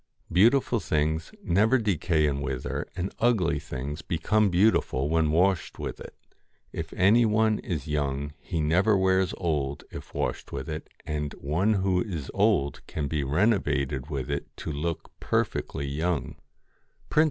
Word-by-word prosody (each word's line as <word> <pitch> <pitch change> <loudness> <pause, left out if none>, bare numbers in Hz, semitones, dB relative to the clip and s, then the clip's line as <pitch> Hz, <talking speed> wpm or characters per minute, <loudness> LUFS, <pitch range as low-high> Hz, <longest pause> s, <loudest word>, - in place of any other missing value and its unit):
Beautiful 120 +5 +4
things 80 -1 -1
never 105 +9 +3
decay 85 - +1
and 70 -1 0
wither, 65 -2 -3
and 90 +1 -3
ugly 95 -10 +2
things 70 +3 -5
become 105 +6 +1
beautiful 90 -7 +2
when 80 -1 +2
washed 90 +4 +1
with - - -5
it. - - -10 0.6
If 80 0 -5
any 105 +6 +5
one 110 0 +2
is 80 -8 -4
young 70 -1 -2
he 85 -5 -3
never 90 +7 +3
wears 95 -1 +2
old 70 -5 -1
if - - -9
washed - - -2
with - - -5
it, 80 0 -5 0.2
and 75 -1 -3
one 85 +10 +1
who 95 -2 +1
is 85 -10 -4
old 100 -9 +2
can 75 -2 -3
be 75 0 -1
renovated 75 - +1
with 70 -3 -3
it 70 - -2
to 80 - -5
look 80 +3 -3
perfectly 70 - -1
young. 75 +3 -2
80 Hz, 145 wpm, -27 LUFS, 75-95 Hz, 0.6 s, any